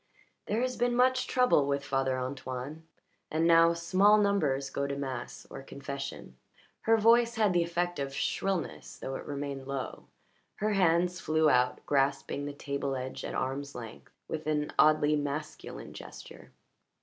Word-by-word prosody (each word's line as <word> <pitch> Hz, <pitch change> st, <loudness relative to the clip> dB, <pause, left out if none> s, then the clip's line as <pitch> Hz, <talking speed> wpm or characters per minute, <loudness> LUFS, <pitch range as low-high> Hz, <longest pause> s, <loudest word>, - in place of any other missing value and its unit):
"There 215 Hz, +3 st, 0 dB
has 255 Hz, 0 st, -1 dB
been 240 Hz, 0 st, +1 dB
much 255 Hz, +1 st, +3 dB
trouble 250 Hz, -, +3 dB
with 140 Hz, 0 st, -1 dB
Father 135 Hz, -2 st, 0 dB
Antoine, 130 Hz, +4 st, -5 dB, 0.4 s
and 160 Hz, +1 st, +1 dB
now 165 Hz, 0 st, +6 dB
small 185 Hz, +5 st, +4 dB
numbers 150 Hz, -10 st, +1 dB
go 140 Hz, 0 st, -1 dB
to 140 Hz, -, -3 dB
mass 130 Hz, -3 st, -5 dB
or -, -, -7 dB
confession." 140 Hz, -, -7 dB, 0.5 s
Her 225 Hz, -, +7 dB
voice 235 Hz, +2 st, +4 dB
had 215 Hz, -4 st, +3 dB
the 175 Hz, -, +3 dB
effect 175 Hz, 0 st, -1 dB
of 135 Hz, -1 st, -2 dB
shrillness 185 Hz, +5 st, -2 dB
though 135 Hz, -, -5 dB
it -, -, -6 dB
remained 140 Hz, -2 st, -5 dB
low; 135 Hz, -1 st, -5 dB, 0.5 s
her 215 Hz, +1 st, 0 dB
hands 180 Hz, -1 st, +2 dB
flew 155 Hz, -1 st, +3 dB
out, 125 Hz, 0 st, +1 dB
grasping 140 Hz, 0 st, 0 dB
the -, -, -3 dB
table 140 Hz, -1 st, -3 dB
edge 130 Hz, 0 st, -5 dB
at -, -, -4 dB
arms' 140 Hz, +2 st, -3 dB
length 115 Hz, -2 st, -9 dB, 0.2 s
with 155 Hz, -1 st, -5 dB
an 150 Hz, -1 st, 0 dB
oddly 150 Hz, -1 st, +5 dB
masculine 145 Hz, +1 st, -5 dB
gesture. -, -, -11 dB
150 Hz, 155 wpm, -30 LUFS, 135-180 Hz, 0.5 s, Her